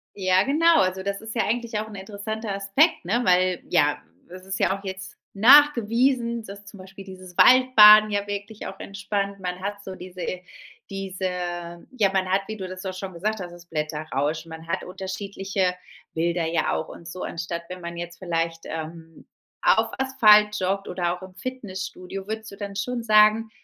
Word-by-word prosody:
Ja 185 -1 +3
genau, 330 +4 +4
also 190 0 0
das 200 0 -3
ist 220 +1 -8
ja 230 - +1
eigentlich 230 -1 -2
auch 220 +1 -4
'n 210 - -11
interessanter 205 +2 -5
Aspekt, 200 - +2
ne? 240 - 0
Weil 185 0 +2
ja, 150 -4 +2 0.3
es 185 +1 -11
ist 195 0 -3
ja 190 - +1
auch 200 - -17
jetzt 190 -1 -7 0.2
nachgewiesen, 235 -1 +4
dass 200 -1 -11
zum 200 0 -12
Beispiel 195 +1 -12
dieses 185 -2 -12
Waldbaden 215 -4 +8
ja 205 0 -1
wirklich 205 +1 -6
auch - - -8
entspannt. 200 0 -3
Man 180 0 -4
hat 205 +1 -5
so 190 - -7
diese 180 0 -8 0.6
diese 190 -1 -4 0.6
ja 215 -7 +1
man 190 -1 +1
hat, 195 +1 +2
wie 220 - -5
du 190 -2 -6
das 185 +1 -8
auch 185 -1 -4
schon 190 0 -6
gesagt 210 +5 -3
hast, 175 -1 -7
das 175 0 -14
Blätterrauschen. 155 0 -3
Man 160 0 -10
hat 185 +3 -2
unterschiedliche 190 0 -3 0.4
Bilder 170 0 0
ja 165 -1 0
auch 160 - -2
und 170 - -12
so 180 +2 -7
anstatt 170 0 -4
wenn 180 0 -8
man 170 0 -7
jetzt 170 0 -7
vielleicht, 165 -2 -2
ähm, 165 +1 -8 0.3
auf - - +3
Asphalt 215 -6 +5
joggt 195 +1 -1
oder 175 -1 -1
auch 180 - -12
im 185 0 -11
Fitnessstudio. 195 -4 -7
Würdest 220 0 -5
du - - -10
dann 200 -1 -7
schon 240 +4 -3
sagen, 215 0 +4
195 Hz, 185 wpm, -24 LUFS, 180-215 Hz, 0.6 s, Waldbaden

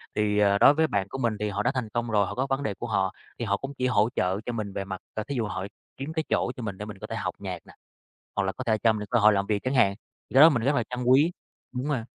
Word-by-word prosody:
Thì, 105 -1 +1
ờ, 100 -1 +4
đối 140 - +7
với 160 +1 +2
bạn 100 -6 -1
của 135 - -5
mình 115 -5 0
thì 105 0 -1
họ 100 +1 -2
đã 125 - +2
thành 120 -4 -2
công 120 +2 -2
rồi, 105 -2 +3
họ - - -5
có 130 +2 -1
vấn 135 +1 0
đề 105 - -1
của 120 +5 -6
họ. 95 -3 0 0.3
Thì 120 - -2
họ 100 -1 +1
cũng 135 +4 -6
chỉ 130 - +1
hỗ 110 -3 +3
trợ 95 +2 0
cho 120 - -2
mình 105 -3 -4
về 100 - -3
mặt, 95 -1 -6
ờ, 110 - -3
thí 140 - -5
dụ 115 -3 0
họ 95 -2 -4 0.3
kiếm 140 +4 -5
cái 160 -1 -1
chỗ - - +1
cho 125 - -7
mình 105 -3 -4
để 105 - -6
mình 105 -2 -8
có - - -7
thể - - -5
học - - -3
nhạc - - -5
nè, - - -15 0.6
hoặc 100 - +2
là 95 - -1
có 130 - -7
thể 110 -2 +1
cho 115 +1 +4
mình 105 -1 -4
cơ 120 - +3
hội 105 0 +6
làm 100 -1 0
việc 105 -1 -1
chẳng 130 +2 -1
hạn, 100 -6 +4 0.4
thì - - -12
cái 135 - +7
đó 155 - +11
mình 120 -6 0
rất 140 +4 +2
là 120 - +2
trân 125 0 -3
quý. 135 +7 +5 0.4
Đúng 125 +3 -3
mà. 130 -6 -1
110 Hz, 330 wpm, -26 LUFS, 100-130 Hz, 0.6 s, đó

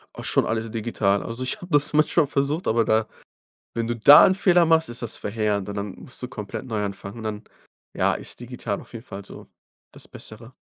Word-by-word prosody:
Auch - - -8
schon - - +2
alles 110 0 -2
digital. 110 -3 0
Also 115 +3 -5
ich 130 - -1
habe 180 - -10
das 145 0 +2
manchmal 155 0 +3
versucht, 145 +5 -1
aber 115 0 +2
da 110 0 +2 0.7
wenn 115 0 -1
du 120 - -1
da 140 +6 +9
'n 190 - +3
Fehler 180 -3 +4
machst, 160 0 +3
ist 120 - -6
das 120 - -4
verheerend 105 -2 -1
und 100 - -5
dann 100 -1 -4
musst 125 - -7
du 125 - -4
komplett 105 -5 -7
neu 110 -4 -2
anfangen, 100 +1 -6
und - - -8
dann, 105 0 -4 0.5
ja, - - +2
ist - - -7
digital 120 -4 -5
auf - - -16
jeden 115 +1 -8
Fall 100 -3 -8
so - - -12 0.4
das - - -12
Bessere. 115 +3 -11
115 Hz, 220 wpm, -24 LUFS, 105-140 Hz, 0.7 s, da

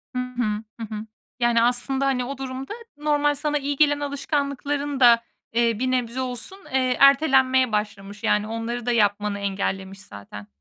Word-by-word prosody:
Hı - - 0
hı. 245 -4 -2 0.2
Hı 225 - -4
hı. 210 +1 -5 0.3
Yani 240 -1 +3
aslında 250 +3 +1
hani 255 -2 +1
o 275 +2 -5
durumda 265 +4 -5 0.2
normal 295 -1 +1
sana 295 +1 -1
iyi 285 0 -2
gelen 290 0 +3
alışkanlıkların 285 0 -2
da, 235 -2 +6 0.3
eee, 230 -2 +2
bir 255 +1 0
nebze 250 0 -1
olsun, 250 - -5 0.2
eee, 255 -1 +2
ertelenmeye 265 -3 +5
başlamış. 205 -1 -4
Yani 210 0 +2
onları 230 +1 -4
da 245 - +1
yapmanı 205 -2 +1
engellemiş 195 -1 -3
zaten. 100 - -11
250 Hz, 160 wpm, -24 LUFS, 215-275 Hz, 0.3 s, da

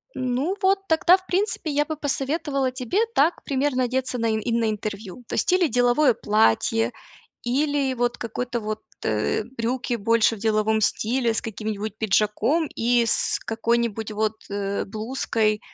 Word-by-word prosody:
Ну 260 +8 -1
вот 385 0 +3
тогда, 350 +3 +5
в 370 - -20
принципе, 375 -3 -1
я 295 +1 +1
бы 315 - -4
посоветовала 280 -1 -1
тебе 255 - -2 0.2
так 315 +5 +2
примерно 270 -2 0
одеться 255 +1 -1
на 230 -1 0
и 220 +1 -1
на 230 -1 +1
интервью. 210 +1 -5
То - - -4
есть - - +1
или 365 -2 +4
деловое 245 +1 +3
платье, 115 - +2 0.5
или 275 +2 +1
вот 245 -1 -1
какой-то 240 +1 -3
вот, 215 0 -4 0.2
э, 110 - 0
брюки 240 +1 -1
больше 230 +1 +2
в - - -12
деловом 220 0 +1
стиле 235 +3 +1
с - - -1
каким-нибудь 215 -1 -5
пиджаком 220 - +1
и 235 0 +2
с 230 - +1
какой-нибудь 225 -1 -1
вот, 215 0 0 0.2
э, 200 0 -2
блузкой, 220 0 -1
э, - - -14
235 Hz, 155 wpm, -24 LUFS, 215-270 Hz, 0.5 s, тогда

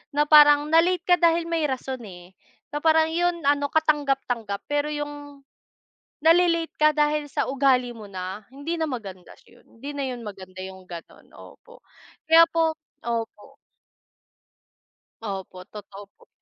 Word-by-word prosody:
Na 295 - +4
parang 295 0 +6
na-late 345 +2 +3
ka 355 -1 +3
dahil 335 0 +3
may 330 -2 -1
rason 260 -1 -4
eh, 180 0 -13 0.4
na 295 - -3
parang 320 0 +3
'yon, 345 -1 -1
ano 285 0 +2
katanggap-tanggap, 270 -9 -1
pero 290 0 0
yung, 290 -1 -7 0.8
nale-late 335 0 +3
ka 305 0 +5
dahil 300 0 +1
sa - - -1
ugali 260 -3 +1
mo 215 - -10
na, 190 +2 -7
hindi 310 +5 -4
na 320 - -1
maganda 195 -8 -9
'yon, - - -22
hindi 275 +5 -8
na 280 -1 -3
'yon 250 -2 -5
maganda 185 -2 -9
yung 190 0 -10
gano'n, 170 -2 -12
opo, 485 0 -16 0.5
kaya 330 +1 +8
po 325 -1 +1 0.3
opo. 235 +3 -5 1.6
Opo, 190 -3 -7
totoo 205 -1 -11
po. - - -23
285 Hz, 145 wpm, -24 LUFS, 215-320 Hz, 1.6 s, kaya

